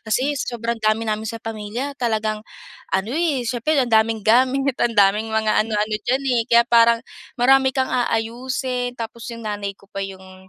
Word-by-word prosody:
Kasi 255 +6 0
sobrang 235 -1 -3
dami 215 +1 +1
namin 215 0 -2
sa 230 - -4
pamilya, 225 +5 -5
talagang 215 -3 -1 0.5
ano, 190 +4 -1
eh, 300 -6 0
siyempre 245 +6 0
ang 250 -4 +1
daming 220 -1 +2
gamit, 260 +4 +3
ang 230 -2 +1
daming 205 +2 +4
mga 220 -1 +1
ano-ano 215 0 -1
diyan, 260 +2 +2
eh. 235 -2 +2
Kaya 235 0 +6
parang 235 0 +5 0.4
marami 265 +2 +4
kang 260 -1 0
aayusin, 245 +1 -2
tapos 230 +1 -7
yung 230 -1 -8
nanay 205 -2 -4
ko 200 - -22
pa 195 - -4
yung 190 -1 -9
230 Hz, 170 wpm, -21 LUFS, 215-250 Hz, 0.5 s, Kaya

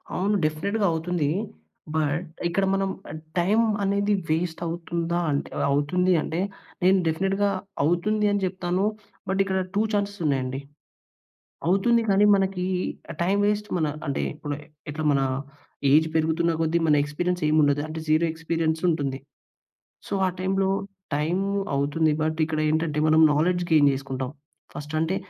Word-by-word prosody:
అవును. 200 +3 +1
డెఫినిట్‌గా 200 +8 0
అవుతుంది. 165 -2 -1 0.7
బట్ 160 +2 0 0.2
ఇక్కడ 195 +3 +1
మనం 195 0 0 0.5
టైమ్ 205 +6 +3 0.2
అనేది 200 +1 +1 0.2
వేస్ట్ 165 +1 -1
అవుతుందా? 170 0 -2
అంటే 140 - -1 0.2
అవుతుంది 180 +6 +2
అంటే, 160 +2 -3 0.4
నేను 190 +2 +5
డెఫినిట్‌గా 195 +5 +1 0.3
అవుతుంది 200 +7 +1
అని 205 -1 0
చెప్తాను. 185 0 -1 0.5
బట్ 190 0 0
ఇక్కడ 190 -1 -1 0.2
టూ 205 - +3
చాన్సెస్ 200 -1 -1
ఉన్నాయండి. 135 -2 0 1.1
అవుతుంది 230 +6 +3
కానీ 200 +1 +5
మనకి 190 -2 0 0.6
టైమ్ 195 +3 +2
వేస్ట్ 210 0 0
మన 160 - +1 0.2
అంటే, 140 - -1
ఇప్పడు 145 -1 -5 0.3
ఎట్లా 155 +1 -4
మన 140 - +2 0.7
ఏజ్ 155 +2 +5
పెరుగుతున్న 160 +1 +2
కొద్దీ 165 +1 +2
మన 150 -2 +4
ఎక్స్పీరియన్స్ 175 +4 -2
ఏమి 155 +1 +3
ఉండదు. 145 0 +2
అంటే, 160 +1 -5
జీరో 155 +2 +3
ఎక్స్పీరియన్స్ 160 0 -1
ఉంటుంది. 140 -4 -2 0.9
సో, - - -4
ఆ - - +1
టైమ్‌లో 190 +1 +1 0.5
టైమ్ 165 +6 0 0.3
అవుతుంది 150 +3 +1
బట్ 155 +1 -1
ఇక్కడేంటంటే, 155 0 0
మనం 155 +1 +5
నాలెడ్జ్ 175 +4 +1
గెయిన్ 150 -3 +6
చేసుకుంటాం. 135 -1 -4 0.4
ఫస్ట్ 150 +1 -7
అంటే 160 +4 0
165 Hz, 135 wpm, -25 LUFS, 155-190 Hz, 1.1 s, గెయిన్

